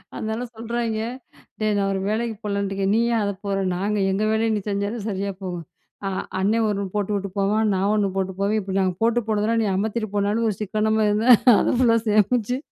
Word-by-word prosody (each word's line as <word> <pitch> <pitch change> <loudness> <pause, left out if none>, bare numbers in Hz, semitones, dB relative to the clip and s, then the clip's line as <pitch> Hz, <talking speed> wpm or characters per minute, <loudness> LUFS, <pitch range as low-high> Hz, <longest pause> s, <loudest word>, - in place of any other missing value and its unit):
அதனால 220 +3 -3
சொல்றாய்ங்க, 230 -1 -2 0.6
டேய் 215 -1 +1
நான் 195 0 +1
ஒரு 190 - -1
வேலைக்கு 225 +1 -1
போகலன்னுட்டுருக்கேன். 200 -1 -1
நீ - - +3
ஏன் 225 - +2
அத 200 0 -1
போற? 195 -1 -1 0.2
நாங்க 205 +3 -1
எங்க 200 +3 0
வேலைய 225 +1 +1
நீ - - 0
செஞ்சாலே 200 +3 -2
சரியா 200 0 -2
போகும். 175 -3 -5 0.4
ஆ - - 0 0.3
அண்ணனே 210 +4 +2
ஒண்ணு 200 -1 -1
போட்டுவுட்டு 200 -1 -1
போவான். 210 +2 +2
நான் 195 +2 +1
ஒண்ணு 200 -2 +1
போட்டு 190 0 -1
போவேன். 210 +2 +1
இப்ப 190 0 -5
நாங்க 185 -1 +1
போட்டு 235 +1 +3
போனதெல்லாம் 220 +2 +1
நீ - - 0
அமத்திட்டு 220 +2 -2
போனாலும் 205 +3 +1
ஒரு 200 - -2
சிக்கனமா 215 +1 0
இருந்த 210 +3 +1 0.3
அத - - +1
ஃபுல்லா 230 -2 +4
சேமிச்சு, 220 +3 +2
210 Hz, 190 wpm, -23 LUFS, 200-220 Hz, 0.6 s, ஃபுல்லா